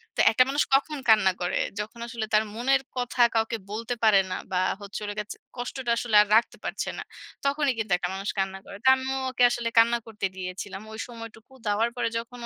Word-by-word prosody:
তো - - -7
একটা 255 +3 +5
মানুষ 285 +2 +2
কখন 295 +2 0
কান্না 200 -4 +6
করে? 175 - 0 0.2
যখন 220 +3 -6
আসলে 230 -1 -4
তার 215 +1 +5
মনের 270 +4 +2 0.2
কথা 245 0 -1
কাউকে 225 +1 +1
বলতে 230 +3 -3
পারে 215 -3 +6
না - - -1 0.2
বা, 180 - 0 0.2
হচ্ছে 200 0 -6
হলো 205 0 -3
গিয়ে 210 -1 -3
ওর - - -9 0.2
কষ্টটা 245 0 -3
আসলে 230 -2 -1
আর 210 - +1
রাখতে 230 - +2
পারছে - - -3
না। - - -5 0.4
তখনই 280 -1 +2
কিন্তু 220 -3 -3
একটা 180 0 -3
মানুষ 195 +2 -4
কান্না 195 0 -1
করে। 200 - -10
তো 260 - 0
আমিও 265 0 -3
ওকে 250 -1 +1
আসলে 240 -1 -1
কান্না 235 +1 +6
করতে 215 -2 -4
দিয়েছিলাম। 190 +2 -6
ওই 220 - -8
সময়টুকু 230 +1 -11
দেওয়ার 215 +3 +2
পরে 235 -2 0
যখন 235 +2 -7
230 Hz, 210 wpm, -26 LUFS, 210-245 Hz, 0.4 s, কান্না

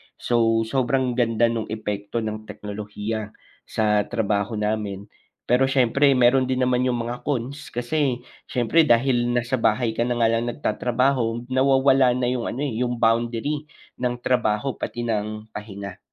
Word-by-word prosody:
So, 115 -1 +2
sobrang 130 +2 0
ganda 120 -1 +2
nung 115 -2 -3
epekto 105 +1 -3
ng 110 0 -5
teknolohiya 105 +1 -5 0.3
sa 105 -1 +1
trabaho 110 -1 -1
namin 105 -1 -3 0.4
pero 130 +2 +4
siyempre 135 +1 +3
meron 125 +1 +4
din 130 0 0
naman 125 0 +2
yung 125 - +1
mga 120 +3 -6
cons 140 +1 -3
kasi 125 0 0 0.2
siyempre, 140 +7 +2
dahil 120 0 +3
nasa 120 +1 0
bahay 115 +1 +2
ka 115 +2 -1
na 120 - 0
nga 115 -1 +3
lang 115 +1 0
nagtatrabaho, 120 +1 0
nawawala 135 -1 +4
na 125 - -2
yung 125 -2 -2
ano, 135 - -3
eh, 120 -6 -2
yung 125 -1 0
boundary 120 +6 0 0.3
ng 125 0 0
trabaho 120 0 +1
pati 120 - -4
ng 110 -1 -3
pahinga, 100 -3 -8
120 Hz, 150 wpm, -23 LUFS, 110-125 Hz, 0.4 s, pero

